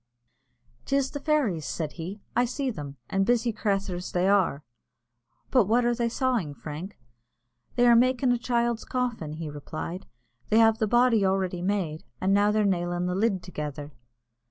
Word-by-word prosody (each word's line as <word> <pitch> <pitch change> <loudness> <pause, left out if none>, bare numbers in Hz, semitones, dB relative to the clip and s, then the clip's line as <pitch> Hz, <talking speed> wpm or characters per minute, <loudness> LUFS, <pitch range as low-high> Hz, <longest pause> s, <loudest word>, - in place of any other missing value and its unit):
"'Tis 275 -1 +1
the 285 - -5
fairies," 275 - +1
said 155 -3 -3
he. 185 +5 -7
"I 245 - +4
see 260 +2 -2
them, 145 - -8
and 195 0 +1
busy 235 +2 +1
crathurs 195 -4 -2
they 180 +1 +2
are." 190 -7 +2 0.9
"But 250 -6 +5
what 235 +4 +2
are 240 - +3
they 235 0 0
sawing, 235 - -1
Frank?" 160 +8 -7 0.8
"They 245 - +4
are 240 -1 +7
makin' 255 +1 +3
a 245 - +1
child's 235 -1 0
coffin," 240 - -2
he 160 0 -5
replied; 155 +5 -6 0.4
"they 215 - +3
have 225 -1 +5
the 220 - +1
body 240 -1 +4
already 190 -2 0
made, 180 -5 -1 0.2
an' 190 +1 +2
they're 205 +1 +4
now 190 -3 +2
nailin' 175 0 -2
the 180 - -1
lid 195 -1 0
together." 150 -4 -6
200 Hz, 165 wpm, -27 LUFS, 175-240 Hz, 0.9 s, are